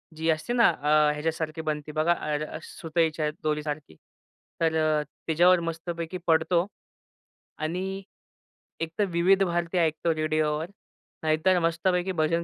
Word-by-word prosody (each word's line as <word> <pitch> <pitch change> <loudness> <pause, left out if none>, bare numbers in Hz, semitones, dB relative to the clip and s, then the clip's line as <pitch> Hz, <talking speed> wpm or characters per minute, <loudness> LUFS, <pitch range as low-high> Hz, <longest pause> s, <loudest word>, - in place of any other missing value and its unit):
जी 160 +1 -1
असते 160 +9 0
ना, 235 -2 +6
अ, 150 0 +3
ह्याच्यासारखी 160 +1 -3
बनती 150 -1 -3
बघा 155 +3 +2 0.2
अर 150 +1 0
अ, - - -6
सुतईच्या 160 -2 -1
दोरीसारखी. 150 - -3 0.7
तर 160 -1 +2
अ, 155 -1 +2 0.2
तिच्यावर 175 +3 +5
मस्तपैकी 170 +1 -5
पडतो 165 +2 +3 0.9
आणि 190 +5 -3 0.8
एकतर 165 +5 -1
विविध 185 +3 +4
भारती 175 0 -1
ऐकतो 160 0 +1
रेडिओवर, 155 0 0 0.6
नाहीतर 160 +4 +3
मस्तपैकी 175 +2 +1
भजन 165 +2 +1
160 Hz, 120 wpm, -27 LUFS, 155-175 Hz, 0.9 s, ना